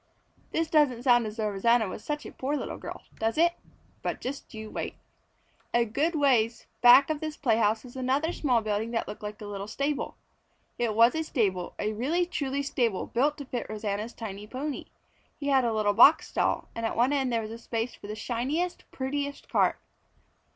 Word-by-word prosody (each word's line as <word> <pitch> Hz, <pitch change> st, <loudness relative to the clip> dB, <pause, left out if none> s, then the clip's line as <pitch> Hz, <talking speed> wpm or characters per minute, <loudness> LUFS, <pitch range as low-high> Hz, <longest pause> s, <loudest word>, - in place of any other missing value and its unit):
This 325 Hz, 0 st, 0 dB
doesn't 290 Hz, -7 st, +3 dB
sound 240 Hz, -3 st, +4 dB
as 215 Hz, +1 st, -7 dB
though 215 Hz, -2 st, 0 dB
Rosanna 225 Hz, +3 st, +3 dB
was 200 Hz, -, -7 dB
such 295 Hz, 0 st, -3 dB
a -, -, -7 dB
poor 285 Hz, +3 st, -2 dB
little -, -, -5 dB
girl, -, -, -8 dB, 0.2 s
does 225 Hz, +5 st, 0 dB
it? 340 Hz, +1 st, +4 dB, 0.5 s
But -, -, -3 dB
just 270 Hz, +2 st, -6 dB
you 220 Hz, -1 st, -8 dB
wait. -, -, -4 dB, 0.8 s
A 235 Hz, 0 st, +4 dB
good 295 Hz, +10 st, 0 dB
ways 240 Hz, -6 st, +2 dB, 0.2 s
back 255 Hz, +4 st, +8 dB
of 305 Hz, -, -2 dB
this 310 Hz, -1 st, -5 dB
playhouse 225 Hz, -4 st, +2 dB
was 250 Hz, -1 st, -12 dB
another 270 Hz, +6 st, 0 dB
small 250 Hz, -6 st, +2 dB
building 215 Hz, +1 st, -1 dB
that 230 Hz, -, -1 dB
looked -, -, -7 dB
like 210 Hz, 0 st, -6 dB
a 210 Hz, -, -8 dB
little 200 Hz, -1 st, -5 dB
stable. 280 Hz, +6 st, -2 dB, 0.6 s
It 230 Hz, -3 st, 0 dB
was 230 Hz, +2 st, +6 dB
a 320 Hz, -, -1 dB
stable 200 Hz, -, -1 dB
a 215 Hz, +1 st, -1 dB
really 300 Hz, +11 st, +1 dB
truly 280 Hz, -5 st, -2 dB
stable 235 Hz, -8 st, 0 dB
built 285 Hz, +5 st, +1 dB
to 285 Hz, -, -7 dB
fit 250 Hz, -2 st, -4 dB
Rosanna's 215 Hz, +1 st, -3 dB
tiny 210 Hz, -2 st, -7 dB
pony. 270 Hz, +5 st, -4 dB, 0.5 s
He 285 Hz, -1 st, -2 dB
had 265 Hz, -2 st, +4 dB
a 235 Hz, -, +1 dB
little 215 Hz, -2 st, +2 dB
box 280 Hz, +9 st, +7 dB
stall, -, -, 0 dB
and 230 Hz, -, -5 dB
at 225 Hz, -, -1 dB
one 245 Hz, +4 st, +4 dB
side 270 Hz, -3 st, +1 dB
there 230 Hz, -1 st, 0 dB
was 230 Hz, +2 st, -8 dB
space 230 Hz, +1 st, -2 dB
for -, -, -11 dB
the 210 Hz, -, -5 dB
shiniest, 265 Hz, +11 st, -2 dB
prettiest 280 Hz, +2 st, -4 dB
cart. -, -, +2 dB
240 Hz, 195 wpm, -28 LUFS, 220-285 Hz, 0.8 s, back